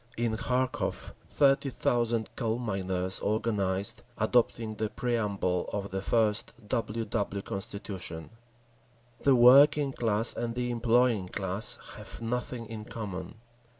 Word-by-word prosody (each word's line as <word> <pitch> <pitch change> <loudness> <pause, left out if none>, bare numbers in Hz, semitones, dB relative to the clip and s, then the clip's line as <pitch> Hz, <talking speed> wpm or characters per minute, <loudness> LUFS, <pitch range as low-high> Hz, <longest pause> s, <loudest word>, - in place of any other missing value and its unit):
In 115 -1 0
Kharkov 125 +2 -1 0.2
thirty 140 0 +3
thousand 120 -3 0
coal 115 -2 -1
miners 95 -5 -2
organised, 100 -3 0 0.2
adopting 115 0 +1
the 110 0 -2
preamble 105 -7 -1
of 100 -1 -4
the 95 - -2
I. 110 +1 0
W. 110 +1 -2
W. 100 -3 -2
constitution: 95 -4 -5 0.9
"The 135 -2 +5
working 140 +3 +7
class 115 -1 +2
and 115 0 -3
the 125 0 -1
employing 120 -3 +2
class 100 +3 -2 0.2
have - - -7
nothing 120 +1 -3
in 110 -1 -7
common." 105 -3 -6
115 Hz, 115 wpm, -29 LUFS, 100-120 Hz, 0.9 s, working